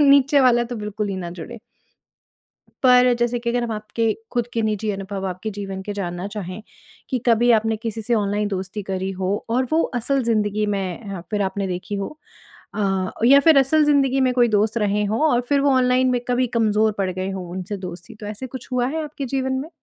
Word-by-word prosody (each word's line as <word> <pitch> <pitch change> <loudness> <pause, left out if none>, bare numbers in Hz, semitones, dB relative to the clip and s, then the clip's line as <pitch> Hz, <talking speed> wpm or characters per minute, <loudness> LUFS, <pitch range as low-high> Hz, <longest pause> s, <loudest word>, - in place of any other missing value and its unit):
नीचे 280 0 +5
वाला 240 -2 +4
तो 240 0 -6
बिल्कुल 210 -1 -3
ही 195 - -3
ना 175 -2 -5
जुड़े। 180 +7 -8 1.2
पर 250 -1 +6
जैसे 240 0 +1
कि 235 0 -2
अगर 240 0 0
हम 230 - -3
आपके 215 +1 -1 0.2
ख़ुद 240 -1 +1
के 230 - 0
निजी 215 0 -1
अनुभव 195 -1 -4
आपके 185 +4 -5
जीवन 195 -2 -6
के 205 - -5
जानना 180 -2 -4
चाहें, 205 -1 -6 0.5
कि 255 - +1
कभी 240 +1 +4
आपने 225 0 +2
किसी 225 0 -5
से 235 +3 +1
ऑनलाइन 205 -1 0
दोस्ती 195 +1 -4
करी 190 0 -3
हो 190 +2 +1 0.2
और 255 +3 +1
वो 325 - +4
असल 265 +3 0
ज़िंदगी 215 -2 +1
में 195 +2 -4
अ, 175 - -6
फ़िर 210 -2 0
आपने 195 +1 -2
देखी 185 +2 -4
हो 200 -1 -2 0.7
अ, 195 -2 0 0.2
या 280 +3 +8
फ़िर 300 0 +6
असल 300 +3 +4
ज़िंदगी 270 -2 +3
में 255 -1 +3
कोई 240 -1 +4
दोस्त 215 +2 +1
रहें 210 -1 +1
हों 220 +5 -1
और 240 - +3
फ़िर 285 -1 +3
वो 280 0 +3
ऑनलाइन 255 0 +3
में 245 -1 +1
कभी 250 +1 +2
कमज़ोर 215 0 +2
पड़ 190 -1 0
गए 185 +1 -3
हों 185 -2 -5
उनसे 185 +3 -5
दोस्ती, 180 -2 -8
तो 215 -1 -9
ऐसे 215 +5 -5
कुछ 255 0 -9
हुआ 245 -1 +1
है 315 +4 -2
आपके 290 -2 -6
जीवन 265 +1 -1
में? 270 +4 -3
220 Hz, 215 wpm, -22 LUFS, 195-250 Hz, 1.2 s, या